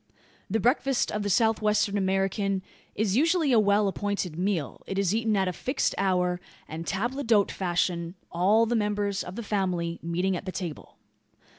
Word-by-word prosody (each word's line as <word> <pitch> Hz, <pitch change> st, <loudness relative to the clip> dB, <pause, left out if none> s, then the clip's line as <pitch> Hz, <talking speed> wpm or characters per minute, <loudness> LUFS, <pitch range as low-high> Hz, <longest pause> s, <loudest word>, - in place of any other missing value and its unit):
The 225 Hz, -, +1 dB
breakfast 255 Hz, +3 st, +1 dB
of 210 Hz, -, -2 dB
the 205 Hz, -, -2 dB
South 220 Hz, +3 st, +3 dB
western 210 Hz, -1 st, +2 dB
American 195 Hz, 0 st, 0 dB, 0.3 s
is 210 Hz, -2 st, 0 dB
usually 320 Hz, +1 st, +3 dB
a 235 Hz, -, +6 dB
well 205 Hz, 0 st, +3 dB
appointed 195 Hz, -4 st, -2 dB
meal. 180 Hz, -5 st, -2 dB
It 195 Hz, -, -3 dB
is 195 Hz, -1 st, +1 dB
eaten 220 Hz, -1 st, +1 dB
at 190 Hz, -1 st, +1 dB
a 180 Hz, -, -1 dB
fixed 260 Hz, -, -1 dB
hour, 180 Hz, -2 st, +1 dB, 0.3 s
and 160 Hz, +2 st, -6 dB
table 240 Hz, +8 st, -1 dB
d'hote 220 Hz, -5 st, +3 dB
fashion 175 Hz, -1 st, -1 dB, 0.2 s
all 200 Hz, +6 st, +3 dB
the 240 Hz, +1 st, 0 dB
members 205 Hz, -2 st, 0 dB
of 180 Hz, -, -8 dB
the 235 Hz, -, -5 dB
family 180 Hz, -5 st, -1 dB
meeting 180 Hz, +3 st, 0 dB
at 180 Hz, -, -6 dB
the 185 Hz, -, -3 dB
table. 175 Hz, -5 st, -6 dB
200 Hz, 175 wpm, -27 LUFS, 180-215 Hz, 0.3 s, a